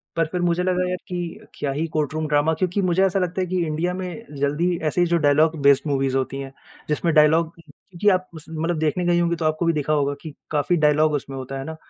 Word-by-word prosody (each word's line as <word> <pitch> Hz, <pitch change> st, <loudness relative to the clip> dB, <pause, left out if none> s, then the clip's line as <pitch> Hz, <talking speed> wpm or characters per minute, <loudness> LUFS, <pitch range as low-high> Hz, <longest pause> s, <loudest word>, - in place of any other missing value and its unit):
पर 165 Hz, -, +2 dB
फिर 180 Hz, -, -2 dB
मुझे 175 Hz, 0 st, +1 dB
लगा 180 Hz, 0 st, +1 dB
यार 180 Hz, -, -1 dB
कि 175 Hz, -3 st, -5 dB
क्या 140 Hz, -, -2 dB
ही 150 Hz, +4 st, -1 dB
कोर्ट 155 Hz, -1 st, -1 dB
रूम 155 Hz, 0 st, -2 dB
ड्रामा 150 Hz, +2 st, +2 dB
क्योंकि 185 Hz, +4 st, -1 dB
मुझे 185 Hz, 0 st, +2 dB
ऐसा 195 Hz, 0 st, +1 dB
लगता 180 Hz, 0 st, -1 dB
है 185 Hz, -, -1 dB
कि 185 Hz, +1 st, -2 dB
इंडिया 165 Hz, +4 st, -1 dB
में 185 Hz, +4 st, -6 dB
ज़ल्दी 155 Hz, +5 st, +1 dB
ऐसे 180 Hz, -, +1 dB
ही 175 Hz, -, +3 dB
जो 170 Hz, 0 st, +2 dB
डायलॉग 155 Hz, +1 st, +3 dB
बेस्ड 140 Hz, -1 st, +5 dB
मूवीज 135 Hz, -2 st, 0 dB
होती 135 Hz, +1 st, -1 dB
हैं, 135 Hz, -1 st, -6 dB, 0.4 s
जिसमें 160 Hz, +2 st, 0 dB
डायलॉग 155 Hz, +2 st, +4 dB
क्योंकि 190 Hz, +4 st, -2 dB
आप 185 Hz, -1 st, +1 dB
उस 160 Hz, -2 st, -10 dB
मतलब 165 Hz, +1 st, -2 dB
देखने 160 Hz, +3 st, 0 dB
गई 175 Hz, 0 st, +3 dB
होंगी 170 Hz, 0 st, +1 dB
तो 165 Hz, -, -3 dB
आपको 155 Hz, +2 st, 0 dB
भी 165 Hz, -, +3 dB
देखा 155 Hz, 0 st, 0 dB
होगा 145 Hz, -1 st, +1 dB
कि 155 Hz, -3 st, -8 dB, 0.2 s
काफ़ी 150 Hz, +3 st, +1 dB
डायलॉग 150 Hz, 0 st, +3 dB
उसमें 135 Hz, -2 st, -4 dB
होता 130 Hz, +1 st, -6 dB
है -, -, -4 dB
ना 160 Hz, -, -6 dB
160 Hz, 245 wpm, -22 LUFS, 150-175 Hz, 0.4 s, बेस्ड